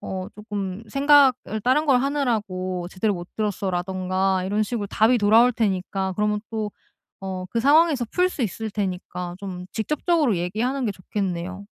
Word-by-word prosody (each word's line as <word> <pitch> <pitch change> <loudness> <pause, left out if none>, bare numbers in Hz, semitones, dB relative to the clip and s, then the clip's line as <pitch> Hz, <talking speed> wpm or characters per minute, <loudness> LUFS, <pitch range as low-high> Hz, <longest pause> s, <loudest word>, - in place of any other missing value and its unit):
어 185 -1 -5
쪼끔 205 -2 -5
생각을 275 -4 +4
다른 260 +5 +3
걸 255 -3 +4
하느라고 210 -10 -1
제대로 200 +3 0
못 175 -1 -7
들었어.'라든가 190 -2 -1
이런 205 +3 0
식으로 210 -2 -3
답이 230 +5 +3
돌아올 225 +4 +5
테니까 190 -3 -1
그러면 210 0 +1 0.2
또 210 -1 -2 0.5
어 190 -1 -5
그 230 - -1
상황에서 290 0 +4
풀 360 0 +2
수 285 - -3
있을 220 +1 -3
테니까 180 -3 -4
좀 185 -2 -6
직접적으로 295 - +1
얘기하는 235 +9 -1
게 210 - 0
좋겠네요. 185 0 -4
210 Hz, 345 characters per minute, -24 LUFS, 185-245 Hz, 0.5 s, 돌아올